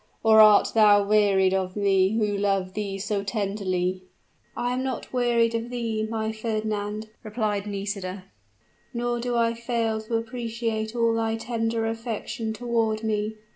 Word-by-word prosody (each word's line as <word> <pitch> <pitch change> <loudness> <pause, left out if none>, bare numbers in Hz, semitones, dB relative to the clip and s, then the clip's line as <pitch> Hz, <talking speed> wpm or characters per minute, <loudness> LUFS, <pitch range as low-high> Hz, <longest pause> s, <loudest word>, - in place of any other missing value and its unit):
or 220 -1 +6
art 215 -1 +7
thou 210 -2 +6
wearied 200 -3 +3
of 185 -1 -1
me 195 0 +2
who 210 -2 +1
love 195 -2 0
thee 200 -1 -3
so 200 0 -2
tenderly?" 195 -3 -2 0.6
"I 245 0 -1
am 255 - -1
not 260 -1 -4
wearied 235 -2 +2
of 230 +1 -3
thee, 225 -3 -2
my 220 -1 -2
Fernand!" 215 -1 -3
replied 210 -2 -2
Nisida, 195 -2 -4 0.7
"nor 240 0 -1
do 245 0 -2
I 230 0 +2
fail 230 -2 -1
to 220 +1 -3
appreciate 230 -1 -3
all 230 -1 +2
thy 225 0 0
tender 225 0 -2
affection 225 0 -4
toward 225 -1 -1
me. 215 0 -1
220 Hz, 145 wpm, -25 LUFS, 205-230 Hz, 0.7 s, art